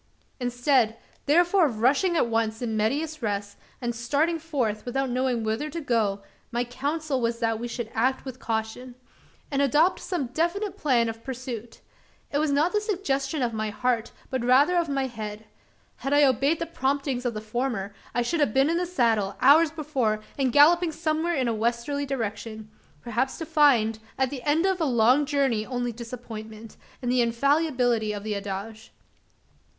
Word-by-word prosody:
Instead, 245 -2 +1 0.3
therefore 350 +3 +4
of 225 -6 -5
rushing 290 - +3
at - - +3
once 225 -1 -1
in 230 -3 -2
medias 295 +8 -1
res, 205 -2 -3 0.2
and 240 -2 -2
starting 290 +8 0
forth, 255 -10 -2
without 265 +1 -2
knowing 250 -2 0
whither 220 +8 -2
to 335 - -5
go, 220 -8 0 0.3
my 240 0 0
counsel 280 +3 -2
was 230 0 0
that 225 -1 0
we 240 - -4
should 235 -2 -5
act 255 +5 0
with 260 -1 -7
caution; 225 +3 -4 0.6
and 280 0 +1
adopt 300 +6 +3
some 350 -8 -2
definite 375 +4 -1
plan 255 - +2
of 225 0 -6
pursuit. 245 -3 -7 0.5
It 285 - +1
was 305 -1 +1
not 300 +7 +2
the 420 - +2
suggestion 305 - -1
of 235 -2 -1
my 215 0 -2
heart, 235 +1 -1 0.2
but 260 -2 -1
rather 270 +8 +4
of 340 -3 +1
my 275 -1 0
head. 215 -3 -6 0.5
Had 275 - -2
I 290 0 +6
obeyed 275 +3 +3
the 335 - -3
promptings 275 -4 -1
of 245 -3 -2
the - - -2
former, 215 -2 -3 0.2
I 240 - +2
should 330 +7 -1
have 275 -7 +1
been 270 +4 +4
in 335 - +1
the 355 0 -1
saddle, 225 - +1
hours 305 +5 +6
before, 275 -9 -1
and 265 -3 +1
galloping 330 +5 +5
somewhere 320 +2 -1
in 260 -4 0
a 230 - +1
westerly 235 +6 -1
direction 220 -3 -4 0.3
perhaps 240 +3 -1
to 325 - -5
find, 275 -9 +3 0.2
at 265 -1 +1
the 270 -3 -5
end 305 +5 +2
of 380 -2 +1
a - - +2
long 255 +2 +3
journey 270 -7 +1
only 245 +1 -3
disappointment, 225 -2 -9 0.3
and 245 - 0
the 250 0 +3
infallibility 245 -3 +1
of 205 -1 -6
the 215 -1 -2
adage. 200 +3 -6
255 Hz, 175 wpm, -26 LUFS, 225-295 Hz, 0.6 s, I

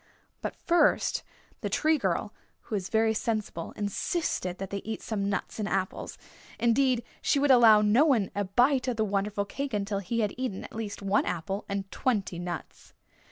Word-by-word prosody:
But - - -4
first 345 0 +2 0.4
the - - -3
Tree 310 0 +2
Girl, 195 0 -1 0.3
who 220 - -5
is 195 -2 -3
very 220 0 +3
sensible, 215 -6 -2
insisted 205 - -2
that 195 0 -6
they 200 - -2
eat 220 +2 -5
some 200 -3 -2
nuts 200 - -3
and 210 -1 -1
apples. 190 -1 -2 0.4
Indeed, 240 +1 +2 0.2
she - - +2
would 280 0 +4
allow 225 -4 +7
no 220 +8 +5
one 240 -10 +2
a 205 0 -1
bite 255 +7 +3
of 250 - 0
the 220 - +2
wonderful 200 0 -1
cake 275 +3 -4
until 200 0 -1
he 230 +5 -1
had 210 -2 0
eaten 250 -7 -3
at - - -10
least 215 -2 -5
one 195 +1 +2
apple 190 +4 -3
and 195 -1 -3
twenty 200 -8 -1
nuts. 175 -3 -7
210 Hz, 180 wpm, -28 LUFS, 195-240 Hz, 0.4 s, allow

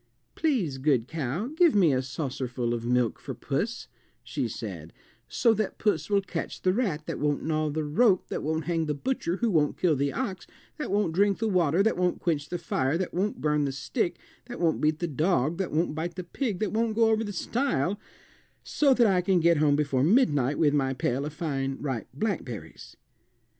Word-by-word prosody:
"Please, 210 - 0
good 130 -4 +2
cow, 155 - -3
give 335 -5 +4
me 175 -8 +5
a 130 - +1
saucerful 130 -3 -3
of 120 0 -3
milk 125 -2 +1
for - - -7
puss," 205 - -3 0.4
she - - -2
said, - - -7 0.3
"so 230 -2 +3
that 215 -2 -2
puss 160 -8 0
will 200 -1 +2
catch 180 -3 -5
the 185 - +3
rat 185 -10 -1
that - - -4
won't 145 -1 0
gnaw 155 -1 0
the 155 +1 -2
rope 185 +6 +3
that - - -3
won't 160 +2 -1
hang 165 -2 0
the 150 - -1
butcher 180 - -2
who 230 +2 0
won't 150 -4 +2
kill 170 -4 +2
the 140 +1 0
ox 210 -8 -4 0.3
that 300 - -3
won't 200 -4 +1
drink 200 +2 +3
the 225 - -1
water 180 -2 +2
that 220 - +1
won't 180 -1 +1
quench 150 -4 -1
the 175 - -2
fire 155 -3 0
that 185 0 -3
won't 195 +4 -1
burn 150 -1 +1
the 140 - -1
stick 170 - -2 0.3
that 245 - -7
won't 165 -2 +1
beat 155 0 +2
the 175 - -2
dog 155 +1 0
that 190 - -2
won't 160 0 0
bite 165 +3 -4
the 185 - -5
pig 210 +3 -3
that 210 0 -1
won't 225 0 0
go 225 0 +4
over 220 0 +2
the 205 - -4
stile 205 - -1 0.6
so 280 -3 +3
that 240 - +4
I 190 -4 +3
can 180 0 +2
get 170 0 +4
home 145 -1 +3
before 140 -3 +1
midnight 145 - +3
with 150 -3 +3
my 135 -2 +1
pail 130 +2 -1
of 150 - -5
fine 135 -5 -2
ripe 130 -7 -3
blackberries." 125 - -5
165 Hz, 205 wpm, -27 LUFS, 145-200 Hz, 0.6 s, me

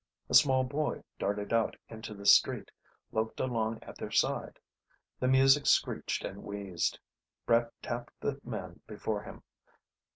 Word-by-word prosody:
A - - -2
small 130 -3 +6
boy 145 +4 -2 0.2
darted 100 +2 -2
out 115 -1 +2
into 110 -1 -8
the 100 0 -10
street, 100 - +5 0.4
loped 110 0 -2
along 115 -3 -1
at - - -11
their - - -5
side. - - 0 0.6
The 130 - +1
music 135 +2 +5
screeched - - +1
and 100 - -6
wheezed. 100 -4 -2 0.5
Brett 115 0 +3
tapped 120 0 -5
the 140 -1 -2
man 90 -7 -6
before 105 -1 -3
him. - - -11
115 Hz, 140 wpm, -31 LUFS, 105-130 Hz, 0.6 s, small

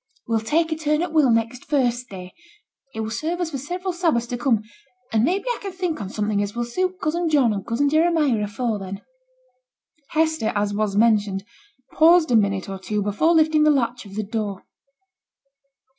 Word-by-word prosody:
We'll 225 -1 +1
take 320 +9 0
a - - +1
turn 305 +1 0
at 355 - -2
t' - - -13
will 300 -5 +4
next 230 +3 0
First 250 -3 0
Day; 185 -2 -9 0.6
it 220 - -3
will 220 0 -4
serve 315 +10 -2
us 345 -2 -2
for 275 - -4
several 360 +6 -4
Sabbaths 330 -10 +1
to 245 - -3
come, 235 -5 +1 0.5
and 220 0 +3
maybe 370 - 0
I 485 - -1
can 395 - -5
think 360 -8 -3
on 195 - -5
something 210 0 -1
as 205 +1 -4
will 240 0 -1
suit 365 +9 -2
cousin 335 +1 -1
John 270 -8 +3
and 195 -1 -4
cousin 240 +7 0
Jeremiah 305 -7 +2
afore 220 +1 -2
then.' 195 0 -7 1.0
Hester, 315 -7 0
as 205 0 0
was 205 -1 -1
mentioned, 210 -3 +2 0.5
paused 325 -2 +5
a - - +4
minute 200 -3 +1
or 195 -1 -6
two 210 +2 -2
before 210 - +2
lifting 315 -1 +4
the 305 - +5
latch 245 -6 0
of 195 - -12
the 215 - -2
door. 205 -2 -4
245 Hz, 195 wpm, -22 LUFS, 210-315 Hz, 1.0 s, paused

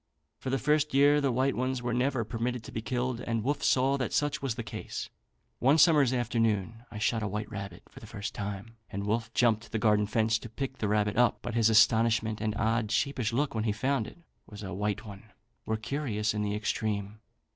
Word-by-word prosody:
For 130 - -4
the 135 - +1
first 150 +2 +1
year 145 +1 +5
the 140 -2 +1
white 130 +3 +1
ones 130 0 -1
were 120 -1 -1
never 125 0 +1
permitted 120 +1 -3
to - - -10
be 110 - -4
killed, 125 0 -2
and 115 -3 -2
Wolfe 145 +2 -1
saw 135 +2 +3
that 130 -3 -2
such 145 -1 0
was 135 -5 -2
the 120 - -4
case. - - -6 0.5
One 135 +5 +4
summer's 150 -4 +5
afternoon 115 -2 0
I 105 - -8
shot 110 +1 0
a 105 - -1
white 105 +1 -4
rabbit 100 -4 -7
for - - -14
the - - -12
first 100 +1 -5
time, 105 +3 -6
and 100 +1 -4
Wolfe 115 +2 -1
jumped 115 -2 +2
the - - -1
garden 105 -1 +3
fence 110 +1 +1
to 115 - -9
pick 130 +3 -5
the 105 - 0
rabbit 105 0 +1
up; 125 0 +4
but 120 - -4
his 115 -1 +4
astonishment 110 0 +3
and 110 -1 -1
odd 110 0 0
sheepish 125 -1 0
look, 140 +4 0
when 110 -1 -1
he 110 - +2
found 130 +2 0
it - - -12 0.3
was 105 0 -10
a 95 - -5
white 105 +2 -2
one, 100 0 -10 0.4
were 110 - 0
curious 110 -3 -2
in 105 - -2
the 105 0 -1
extreme. 105 -1 -2
115 Hz, 220 wpm, -29 LUFS, 105-130 Hz, 0.5 s, year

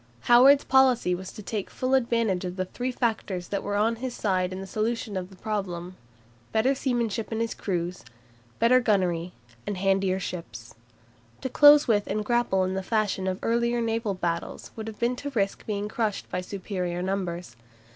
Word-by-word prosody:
Howard's 265 +4 +6
policy 260 -8 +4
was 185 +1 -5
to 210 - -10
take 205 -1 -4
full 255 +1 -2
advantage 230 -7 +2
of 180 -1 -4
the 185 -1 -2
three 250 +7 -3
factors 215 -7 -2
that 200 -1 -1
were 205 - -3
on 225 +3 +2
his 250 +1 -4
side 185 -3 0
in 185 - -5
the 195 - -6
solution 215 +1 -2
of 185 -1 -4
the 190 - -14
problem, 185 -4 -4 0.6
better 230 +5 +3
seamanship 235 -5 -1
in 225 - -2
his 230 0 -1
crews, 175 - -3 0.5
better 240 +3 +5
gunnery, 180 -7 +1 0.4
and 205 - -2
handier 195 0 +1
ships. 145 -11 -7 0.7
To 260 - -3
close 290 +2 +7
with 205 -3 +2
and 210 +1 -2
grapple 240 -5 +2
in 185 0 -1
the 190 - -2
fashion 205 -2 0
of 185 0 -1
earlier 235 +1 +1
naval 225 -3 -1
battles 170 -2 -3
would 220 -1 -6
have 220 -1 -7
been 240 +1 0
to 285 - -4
risk 195 -2 -1
being 205 -1 -2
crushed 215 -1 -2
by 180 - -1
superior 180 -2 -4
numbers. 180 - -3
205 Hz, 180 wpm, -26 LUFS, 185-235 Hz, 0.7 s, close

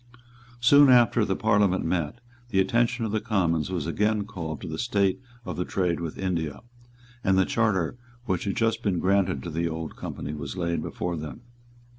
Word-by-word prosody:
Soon 140 +4 +7
after 120 -2 +5
the 95 -2 0
Parliament 100 -4 +2
met, 90 +7 -2 0.3
the 95 - +1
attention 120 +4 +2
of 110 - -3
the 110 0 0
Commons 90 -8 0
was 90 -6 -2
again 105 +4 0
called 80 -6 -5
to - - -6
the 80 0 -5
state 100 -3 +1 0.3
of - - -5
the 90 - 0
trade 90 -2 -1
with 85 -2 -5
India; 85 -6 -2 0.6
and 95 -1 +3
the 95 - +4
charter 105 -4 0 0.3
which 95 -4 -1
had 100 - -1
just 115 0 +1
been 100 -4 0
granted 95 0 +1
to 85 - -5
the 85 +2 -1
Old 80 0 -5
Company 75 - -6
was 75 +3 -6
laid 85 -1 -1
before 85 -1 -3
them. 75 +9 -7
95 Hz, 185 wpm, -26 LUFS, 85-110 Hz, 0.6 s, Soon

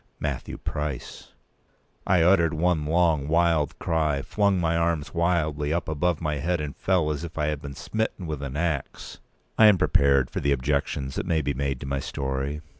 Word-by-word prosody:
Matthew - - -4
Price! 75 -3 -5 0.7
I 90 -3 +4
uttered 85 -3 +4
one 80 -2 +1
long 80 -3 +2
wild 80 -2 +2
cry, 75 -4 0
flung 100 0 +1
my 85 -1 +1
arms 85 -2 0
wildly 80 -4 0
up 85 0 -1
above 80 +2 0
my 75 -2 -1
head, 85 +3 -1
and 75 -2 -5
fell 90 -5 +1
as 75 +1 -4
if 85 -1 -8
I 75 - +1
had 75 -2 -3
been 70 -1 -8
smitten 110 -1 -3
with 75 -3 -4
an 70 0 -5
axe. 80 -4 -3 0.4
I 110 - +9
am 105 -3 +6
prepared 70 -5 +3
for - - -2
the 70 0 +2
objections 70 0 -1
that - - -4
may 80 -2 +1
be 70 - -1
made 70 -1 -2
to - - -5
my 70 0 -2
story. 70 +2 -3
75 Hz, 190 wpm, -25 LUFS, 70-85 Hz, 0.7 s, I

